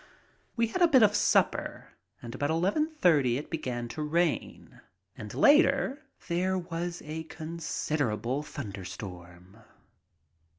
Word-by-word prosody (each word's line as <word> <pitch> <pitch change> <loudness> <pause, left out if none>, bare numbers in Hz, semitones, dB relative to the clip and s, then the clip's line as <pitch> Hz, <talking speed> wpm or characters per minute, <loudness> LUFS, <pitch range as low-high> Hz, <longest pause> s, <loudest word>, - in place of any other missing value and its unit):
We 230 -2 +2
had 365 - -3
a 345 - +7
bit 265 -7 +6
of 210 -1 +5
supper, - - +1 0.3
and 120 -1 -7
about 145 +2 -2
eleven 190 - +1
thirty 155 - +2
it 145 - -7
began 125 -7 -3
to 155 - -5
rain, 165 +3 -2 0.3
and - - -8
later 280 -1 +4 0.3
there 185 +2 0
was 175 0 -4
a 160 +1 -5
considerable 150 -7 -2
thunderstorm. 95 -5 -9
160 Hz, 120 wpm, -29 LUFS, 120-185 Hz, 0.3 s, a